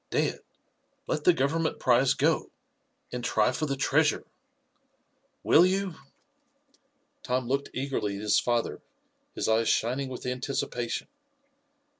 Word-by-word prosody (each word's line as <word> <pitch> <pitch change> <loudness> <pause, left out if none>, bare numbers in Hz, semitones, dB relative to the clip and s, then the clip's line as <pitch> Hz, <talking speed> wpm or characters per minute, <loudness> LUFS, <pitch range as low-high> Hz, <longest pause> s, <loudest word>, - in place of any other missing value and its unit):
Dad, - - 0 0.7
let 150 - -2
the - - +8
Government 160 +1 0
prize 125 +1 +3
go, - - +1 0.6
and 125 0 -4
try 125 - +2
for 155 +4 -2
the 140 -1 -2
treasure. - - +2 1.2
Will 165 - +6
you?" 190 0 +1 1.3
Tom 125 0 -1
looked 140 +2 -1
eagerly 130 -7 -2
at 100 - -6
his 105 - +3
father, 120 -1 -1 0.5
his - - -2
eyes 110 0 +2
shining 130 +4 0
with 125 - -7
anticipation. 125 -2 -3
130 Hz, 120 wpm, -28 LUFS, 120-140 Hz, 1.3 s, the